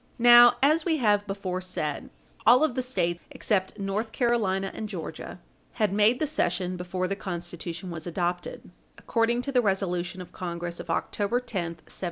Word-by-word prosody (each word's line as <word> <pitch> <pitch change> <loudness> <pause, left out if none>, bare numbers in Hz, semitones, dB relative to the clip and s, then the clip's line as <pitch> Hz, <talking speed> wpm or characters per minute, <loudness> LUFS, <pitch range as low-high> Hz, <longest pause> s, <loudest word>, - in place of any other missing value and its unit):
Now, 240 0 +8
as 310 +3 +4
we 320 -2 +1
have 205 -5 +2
before 190 -2 -3
said, 155 -5 -3 0.4
all 245 +5 +7
of 310 -5 +2
the 255 - -1
States 175 -9 -1
except 190 -3 -1
North 205 +3 -2
Carolina 210 -7 0
and 215 -1 -5
Georgia 170 -1 -7 0.3
had 210 -4 0
made 210 +4 +4
the 310 - 0
cession 185 - -1
before 180 +1 -3
the 195 - -2
Constitution 175 -2 -6
was 165 0 -6
adopted, 175 0 -3 0.3
according 235 +1 0
to 275 - -3
the 250 -2 +3
resolution 185 -3 -1
of 180 - -9
Congress 170 -1 -5
of - - -8
October 205 +7 0
10, - - -14 0.2
1780. 170 -1 -9
195 Hz, 170 wpm, -27 LUFS, 175-235 Hz, 0.4 s, Now